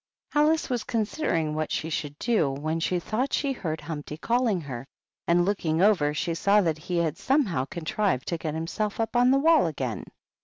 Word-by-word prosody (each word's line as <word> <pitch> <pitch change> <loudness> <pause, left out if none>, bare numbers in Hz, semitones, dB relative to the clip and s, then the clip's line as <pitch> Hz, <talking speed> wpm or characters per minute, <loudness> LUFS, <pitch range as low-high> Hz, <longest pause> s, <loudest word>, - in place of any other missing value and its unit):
Alice 305 +2 +3
was 245 -3 -1
considering 210 - -1
what 155 0 -2
she 160 - -2
should 145 -1 -3
do, 220 - +1
when 155 +4 -2
she 180 +2 0
thought 235 +10 -2
she 280 -2 0
heard 160 - -4
Humpty 150 -1 -6
calling 230 0 +1
her, 130 -5 -6 0.4
and 175 +1 +4
looking 170 -5 0
over 185 -7 +4
she 160 +3 -2
saw 200 +5 +3
that 160 -4 0
he 175 +3 -3
had 165 0 0
somehow 200 - +1
con 165 +5 -7
trived 185 -5 0
to 170 - -3
get 155 -1 -3
himself 200 +7 -3
up 225 +1 -1
on 245 +1 +5
the 270 - +5
wall 315 - +4
again. 130 -7 -4
170 Hz, 195 wpm, -26 LUFS, 155-225 Hz, 0.4 s, on